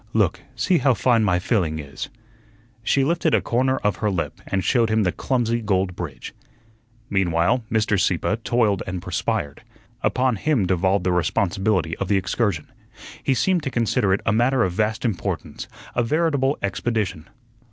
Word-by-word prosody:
Look, -, -, +2 dB, 0.2 s
see 180 Hz, -3 st, +2 dB
how 130 Hz, -3 st, +3 dB
fine 115 Hz, +1 st, +3 dB
my 90 Hz, -4 st, +2 dB
filling 90 Hz, -5 st, 0 dB
is." 70 Hz, -2 st, -7 dB, 0.7 s
She 135 Hz, +4 st, +2 dB
lifted 160 Hz, +1 st, +2 dB
a -, -, +4 dB
corner 130 Hz, +2 st, +1 dB
of 105 Hz, -2 st, 0 dB
her 105 Hz, -, 0 dB
lip 90 Hz, -4 st, -3 dB
and 95 Hz, -1 st, -1 dB
showed 115 Hz, -3 st, +2 dB
him 110 Hz, 0 st, +2 dB
the 90 Hz, -, +1 dB
clumsy 120 Hz, -1 st, -1 dB
gold 95 Hz, -4 st, 0 dB
bridge. 75 Hz, -8 st, -7 dB, 0.7 s
Meanwhile, 95 Hz, +5 st, +1 dB
Mr. 105 Hz, -3 st, +2 dB
Sieppe 95 Hz, +4 st, +1 dB
toiled 115 Hz, -4 st, +1 dB
and 90 Hz, 0 st, -3 dB
perspired. 70 Hz, -4 st, -2 dB, 0.4 s
Upon 125 Hz, -3 st, +1 dB
him 130 Hz, -3 st, +1 dB
devolved 95 Hz, +1 st, +1 dB
the 90 Hz, -, +2 dB
responsibility 90 Hz, 0 st, 0 dB
of 100 Hz, -, -3 dB
the 100 Hz, -, +3 dB
excursion. 95 Hz, -3 st, -1 dB, 0.5 s
He 135 Hz, -, +1 dB
seemed 185 Hz, +5 st, +2 dB
to 135 Hz, -, -3 dB
consider 115 Hz, -4 st, +1 dB
it 95 Hz, -, +2 dB
a 100 Hz, -, +2 dB
matter 120 Hz, +3 st, +3 dB
of 95 Hz, -, 0 dB
vast 110 Hz, +5 st, -1 dB
importance, 110 Hz, -6 st, -3 dB, 0.3 s
a 120 Hz, -, +1 dB
veritable 145 Hz, +1 st, +1 dB
expedition. 100 Hz, -4 st, -2 dB
105 Hz, 165 wpm, -23 LUFS, 95-120 Hz, 0.7 s, a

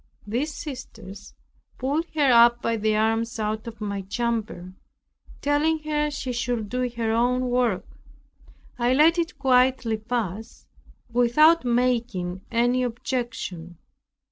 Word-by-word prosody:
These 255 Hz, +8 st, -2 dB
sisters 210 Hz, -, -9 dB, 0.4 s
pulled 290 Hz, +6 st, -1 dB
her 245 Hz, -6 st, +6 dB
by 230 Hz, -1 st, -1 dB
the 215 Hz, 0 st, 0 dB
arms 225 Hz, +2 st, 0 dB
out 215 Hz, +1 st, -2 dB
of 230 Hz, -2 st, -8 dB
my 200 Hz, -2 st, -3 dB
chamber, 215 Hz, -3 st, -3 dB, 0.7 s
telling 295 Hz, +3 st, +2 dB
her 300 Hz, -1 st, 0 dB
she 265 Hz, -3 st, -4 dB
should 240 Hz, -3 st, -2 dB
do 250 Hz, +1 st, -1 dB
her 225 Hz, -1 st, 0 dB
own 250 Hz, +2 st, +1 dB
work. 240 Hz, -7 st, +1 dB, 0.9 s
I 240 Hz, +1 st, +2 dB
let 325 Hz, +4 st, +5 dB
it 335 Hz, -1 st, -2 dB
quietly 255 Hz, -4 st, +2 dB
pass, 220 Hz, -2 st, -4 dB, 0.5 s
without 280 Hz, +6 st, +4 dB
making 235 Hz, -7 st, 0 dB
any 240 Hz, +2 st, +2 dB
objection. 230 Hz, -8 st, -4 dB
240 Hz, 115 wpm, -24 LUFS, 220-260 Hz, 0.9 s, her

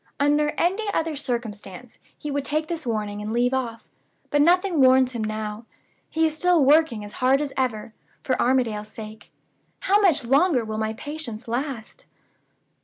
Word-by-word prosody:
Under 295 Hz, +1 st, +2 dB
any 405 Hz, +5 st, 0 dB
other 320 Hz, -1 st, -1 dB
circumstances 235 Hz, -5 st, -6 dB, 0.2 s
he 300 Hz, -, -5 dB
would 285 Hz, 0 st, -1 dB
take 305 Hz, +2 st, -1 dB
the 320 Hz, -7 st, -4 dB
warning 210 Hz, -2 st, -3 dB
and 210 Hz, +1 st, -4 dB
leave 245 Hz, +2 st, +1 dB
off. 235 Hz, -4 st, -3 dB, 0.4 s
But 290 Hz, -, +3 dB
nothing 350 Hz, 0 st, +3 dB
warns 260 Hz, 0 st, +5 dB
him 235 Hz, -3 st, -4 dB
now. 215 Hz, +1 st, -4 dB, 0.4 s
He 320 Hz, 0 st, +1 dB
is 315 Hz, -1 st, 0 dB
still 345 Hz, -3 st, +3 dB
working 280 Hz, -7 st, +3 dB
as 205 Hz, -, -11 dB
hard 260 Hz, +2 st, +4 dB
as 290 Hz, -2 st, -3 dB
ever, 225 Hz, -4 st, -2 dB, 0.3 s
for 265 Hz, -, 0 dB
Armadale's 240 Hz, -5 st, +1 dB
sake. 215 Hz, -1 st, -10 dB, 0.5 s
How 405 Hz, +2 st, +3 dB
much 345 Hz, -11 st, +3 dB
longer 275 Hz, -1 st, +3 dB
will 215 Hz, 0 st, -4 dB
my 220 Hz, 0 st, -1 dB
patience 255 Hz, -4 st, -7 dB
last?" 255 Hz, -, -5 dB
260 Hz, 165 wpm, -24 LUFS, 220-305 Hz, 0.5 s, warns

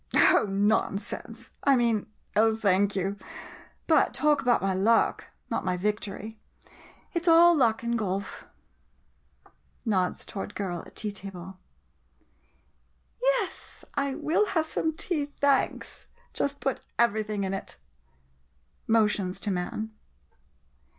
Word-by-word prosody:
Oh— -, -, +5 dB
nonsense! 200 Hz, 0 st, -1 dB
I 280 Hz, -1 st, +5 dB
mean— 235 Hz, -4 st, +1 dB, 0.3 s
oh, 220 Hz, +1 st, +4 dB
thank 200 Hz, -2 st, +2 dB
you 195 Hz, +1 st, -1 dB, 0.3 s
— -, -, -20 dB
but 310 Hz, -, +4 dB
talk 300 Hz, +2 st, +3 dB
about 245 Hz, -2 st, +3 dB
my 195 Hz, 0 st, 0 dB
luck 205 Hz, +5 st, +2 dB
— -, -, -43 dB
not -, -, -1 dB
my 180 Hz, -1 st, 0 dB
victory. 210 Hz, +2 st, -3 dB, 0.7 s
It 340 Hz, -1 st, -2 dB
's -, -, -7 dB
all 340 Hz, +1 st, +8 dB
luck 235 Hz, -6 st, +2 dB
in 235 Hz, 0 st, 0 dB
golf! 200 Hz, -2 st, -3 dB, 1.4 s
[Nods 190 Hz, -5 st, 0 dB
toward 195 Hz, -, -5 dB
the -, -, -15 dB
girl 180 Hz, -4 st, -3 dB
at -, -, -17 dB
tea 210 Hz, -2 st, -2 dB
table.] 190 Hz, -2 st, -9 dB, 1.6 s
Yes, -, -, -1 dB
I 280 Hz, -1 st, -1 dB
will 345 Hz, +7 st, +1 dB
have 320 Hz, -, +2 dB
some 315 Hz, 0 st, -1 dB
tea, 310 Hz, -2 st, -2 dB
thanks. 280 Hz, -2 st, 0 dB, 0.3 s
Just 280 Hz, 0 st, -1 dB
put 270 Hz, -2 st, -1 dB, 0.2 s
everything 215 Hz, -3 st, +1 dB
in 190 Hz, 0 st, -2 dB
it! 195 Hz, -, -6 dB, 1.1 s
[Motions 210 Hz, -4 st, +2 dB
to 205 Hz, -, -2 dB
man. 190 Hz, +4 st, -3 dB
220 Hz, 130 wpm, -27 LUFS, 195-275 Hz, 1.6 s, all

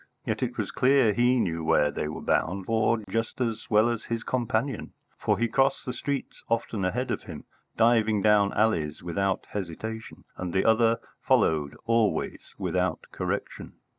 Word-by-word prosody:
Yet -, -, -2 dB
it 125 Hz, -1 st, -2 dB
was 105 Hz, -3 st, -2 dB
clear 130 Hz, -3 st, +4 dB
he 120 Hz, +3 st, +3 dB
knew 85 Hz, -6 st, -1 dB
where 75 Hz, -2 st, +3 dB
they -, -, -3 dB
were 75 Hz, -, -6 dB
bound 95 Hz, +2 st, 0 dB
for 115 Hz, +1 st, +2 dB
just 115 Hz, +2 st, -2 dB
as 115 Hz, -3 st, -2 dB
well 110 Hz, +1 st, +5 dB
as 115 Hz, -2 st, -2 dB
his 115 Hz, -1 st, -3 dB
companion, 120 Hz, 0 st, -1 dB, 0.3 s
for -, -, +1 dB
he 120 Hz, -, +1 dB
crossed 135 Hz, +4 st, +1 dB
the 125 Hz, -, -3 dB
streets 140 Hz, +2 st, -4 dB
often 115 Hz, -3 st, -1 dB
ahead 125 Hz, +7 st, -1 dB
of -, -, -2 dB
him, -, -, -8 dB, 0.3 s
diving 110 Hz, -3 st, +3 dB
down 105 Hz, -2 st, +4 dB
alleys 80 Hz, -9 st, 0 dB
without 95 Hz, +2 st, -1 dB
hesitation, 105 Hz, +4 st, -6 dB
and 90 Hz, -2 st, -5 dB
the 95 Hz, -, +2 dB
other 115 Hz, 0 st, +4 dB, 0.2 s
followed 75 Hz, -3 st, +2 dB
always 115 Hz, -2 st, 0 dB
without -, -, -1 dB
correction. -, -, -4 dB
110 Hz, 165 wpm, -27 LUFS, 100-120 Hz, 0.3 s, well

